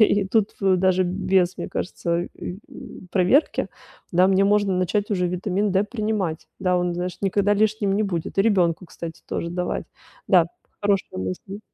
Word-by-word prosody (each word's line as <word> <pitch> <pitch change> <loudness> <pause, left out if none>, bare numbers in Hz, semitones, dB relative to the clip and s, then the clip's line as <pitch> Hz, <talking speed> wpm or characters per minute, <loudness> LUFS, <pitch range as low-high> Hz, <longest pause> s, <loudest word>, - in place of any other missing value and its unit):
и 205 -2 +4
тут 215 0 +2
в 190 -2 +3
даже 185 0 +3
без, 185 0 +1
мне - - -4
кажется, 175 -1 -2
ы 180 - -7
м, 185 - -11
проверки. 195 - +3 0.4
Да, 180 +2 +5
мне 195 0 +4
можно 205 -1 +3
начать 200 +4 0
уже 180 -3 +1
витамин 190 +3 -1
D 195 +2 +3
принимать. 210 -7 -2
Да, 180 -1 +1
он, 175 0 -1
знаешь, 180 +1 -4
никогда 200 +1 +2
лишним 210 -1 +1
не 215 - +2
будет. 180 -3 -3
И - - +6
ребёнку, 180 -5 +2
кстати, 165 0 -8
тоже 170 - -3
давать. 180 +1 -3 0.4
Да, 175 -3 +6 0.3
хорошая 200 - 0
мысль. 95 - -5
190 Hz, 170 wpm, -23 LUFS, 180-205 Hz, 0.4 s, И